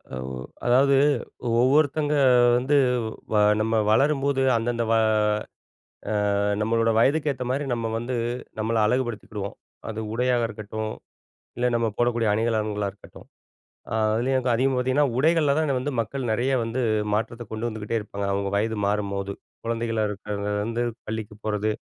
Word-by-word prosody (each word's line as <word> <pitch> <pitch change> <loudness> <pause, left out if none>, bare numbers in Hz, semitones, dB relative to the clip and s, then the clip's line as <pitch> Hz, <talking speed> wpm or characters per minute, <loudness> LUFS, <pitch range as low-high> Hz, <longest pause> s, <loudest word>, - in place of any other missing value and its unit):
ஒவ் 65 0 -5 0.2
அதாவது 135 +3 +4 0.7
ஒவ்வொருத்தங்க 145 +3 +2 0.4
வந்து, 130 +4 +1 0.6
வ - - +2 0.3
நம்ம 110 +1 0 0.2
வளரும்போது, 140 +2 +2
அந்தந்த 115 +1 0
வ - - +4 1.4
அ - - +1 0.2
நம்மளோட 115 +1 +2
வயதுக்கு 145 +5 +3
ஏத்த 130 -1 -5
மாதிரி 140 +3 0
நம்ம 115 -1 -2
வந்து 120 +2 -4 0.4
நம்மள 110 +1 -1
அழகுபடுத்திகிடுவோம். 110 -4 -2 0.3
அது 110 0 -4
உடையாக 120 0 +1
இருக்கட்டும், 110 0 -5 0.7
இல்ல 125 0 +2
நம்ம 115 -1 +1
போடக்கூடிய 120 -1 +1
அணிகலன்ங்களா 105 -2 0
இருக்கட்டும். 100 - -16 0.6
அ - - -2 0.2
அதுலேயும் 130 +4 +1
அங்க 125 0 -1
அதிகமா 130 +2 +1
பாத்தீங்கன்னா, 130 +3 +2
உடைகள்ல 155 0 +3
தான் 160 - +1
அது 135 -2 +1
வந்து 145 +3 -3
மக்கள் 120 +3 -3
நெறைய 130 +4 +1
வந்து 115 +3 -2 0.3
மாற்றத்த 115 +2 -2
கொண்டு 110 +2 -2
வந்துகிட்டே 110 0 -3
இருப்பாங்க, 100 -1 -5
அவங்க 100 0 -1
வயது 110 +1 0
மாறும்போது. 100 -1 -1 0.3
குழந்தைகளா 115 -1 -1
இருக்கிறதுலருந்து 105 +2 -3 0.2
பள்ளிக்கு 110 -1 -5
போறது, 110 0 0
115 Hz, 135 wpm, -25 LUFS, 110-130 Hz, 1.4 s, அதாவது